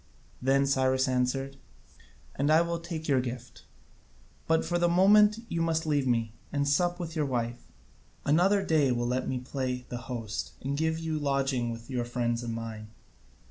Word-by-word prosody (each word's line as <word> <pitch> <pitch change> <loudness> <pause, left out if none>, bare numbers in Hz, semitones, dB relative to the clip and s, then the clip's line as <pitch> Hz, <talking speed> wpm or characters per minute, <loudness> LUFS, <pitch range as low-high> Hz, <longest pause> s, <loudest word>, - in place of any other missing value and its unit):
Then 135 +2 +3
Cyrus 130 -1 +2
answered: 130 +2 -1 0.8
"And 140 +2 0
I 160 +2 +6
will 170 0 -2
take 165 -2 -6
your 135 -3 +3
gift: 125 0 -7 0.8
but 160 0 +2
for 175 0 0
the 175 0 +3
moment 210 +4 +6
you 165 - -2
must 165 0 0
leave 145 -3 +1
me, 115 -3 0 0.2
and 140 0 0
sup 175 +5 +1
with 165 -2 -5
your 150 -3 0
wife: 120 -2 -3 0.6
another 190 +7 +3
day 155 -5 +3
you 125 - +1
will 120 0 -1
let 125 +1 -1
me 130 - -1
play 125 0 -3
the 120 - -4
host, 115 -3 -4
and 140 +2 -1
give 160 +2 0
you 160 -1 -2
lodging 135 -4 0
with 115 0 -7
your 125 -3 -2
friends 120 -1 -1
and 115 -1 -4
mine." 110 -2 -6
135 Hz, 180 wpm, -29 LUFS, 125-160 Hz, 0.8 s, I